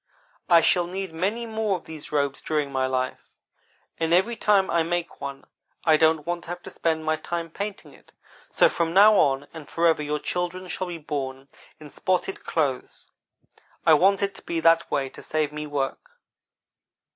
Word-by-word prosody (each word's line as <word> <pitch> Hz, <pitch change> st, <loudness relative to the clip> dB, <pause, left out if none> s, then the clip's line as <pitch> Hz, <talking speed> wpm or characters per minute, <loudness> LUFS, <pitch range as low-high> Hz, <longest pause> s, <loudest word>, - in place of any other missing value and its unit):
I 170 Hz, -1 st, +7 dB
shall 175 Hz, +1 st, +3 dB
need 190 Hz, -1 st, -5 dB
many 200 Hz, +8 st, -1 dB
more 220 Hz, -3 st, -1 dB
of -, -, -15 dB
these 160 Hz, -2 st, -10 dB
robes 140 Hz, -2 st, 0 dB
during 150 Hz, -3 st, -1 dB
my 130 Hz, -1 st, 0 dB
life; 130 Hz, 0 st, -3 dB, 0.7 s
and 165 Hz, +1 st, +2 dB
every 225 Hz, +6 st, +2 dB
time 205 Hz, -3 st, +3 dB
I 170 Hz, -, +3 dB
make 175 Hz, +1 st, -3 dB
one, 140 Hz, 0 st, -6 dB, 0.4 s
I 160 Hz, -2 st, +6 dB
don't 160 Hz, -1 st, +3 dB
want 175 Hz, 0 st, -3 dB
to -, -, -11 dB
have 175 Hz, 0 st, -6 dB
to -, -, -9 dB
spend 160 Hz, -1 st, -1 dB
my 155 Hz, 0 st, +1 dB
time 170 Hz, 0 st, -4 dB
painting 200 Hz, +3 st, -6 dB
it; -, -, -21 dB, 0.4 s
so -, -, +5 dB
from 170 Hz, 0 st, -1 dB
now 210 Hz, +2 st, +8 dB
on 140 Hz, -6 st, +3 dB
and 160 Hz, -3 st, -10 dB
forever 165 Hz, -2 st, +2 dB
your 150 Hz, 0 st, -1 dB
children 180 Hz, +3 st, -3 dB
shall 185 Hz, -, -3 dB
be 175 Hz, -1 st, -5 dB
born 140 Hz, -3 st, -5 dB, 0.3 s
in 150 Hz, -2 st, -12 dB
spotted 185 Hz, +1 st, -1 dB
clothes. 140 Hz, -6 st, -2 dB, 0.7 s
I 160 Hz, -, +7 dB
want 195 Hz, +6 st, +4 dB
it 200 Hz, 0 st, -1 dB
to -, -, -11 dB
be 165 Hz, -, -3 dB
that 165 Hz, 0 st, +4 dB
way 135 Hz, -1 st, 0 dB
to -, -, -12 dB
save 155 Hz, -1 st, -1 dB
me 150 Hz, 0 st, -5 dB
work. 145 Hz, -, -3 dB
165 Hz, 185 wpm, -25 LUFS, 150-185 Hz, 0.7 s, now